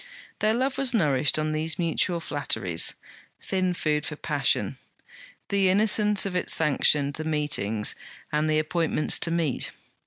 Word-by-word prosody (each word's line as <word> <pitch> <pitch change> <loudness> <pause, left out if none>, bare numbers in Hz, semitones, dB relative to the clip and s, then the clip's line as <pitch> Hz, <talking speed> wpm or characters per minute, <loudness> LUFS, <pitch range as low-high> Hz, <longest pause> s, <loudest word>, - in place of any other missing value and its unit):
Their 215 +1 +2
love 260 +2 -1
was 260 -3 +2
nourished 145 - +2
on 155 0 -1
these 155 +1 -1
mutual 170 0 0
flatteries. 95 - -1 0.4
Thin 185 -1 -1
food 150 -3 0
for 150 - -5
passion! - - 0 0.7
The 195 -2 +2
innocence 210 +1 +2
of 190 -2 -4
it 180 - -2
sanctioned 145 -2 +3
the 155 - -5
meetings 135 -9 -1 0.4
and 150 +1 0
the 155 - +2
appointments 155 0 0
to - - -2
meet. 165 -5 0
160 Hz, 145 wpm, -26 LUFS, 150-190 Hz, 0.7 s, sanctioned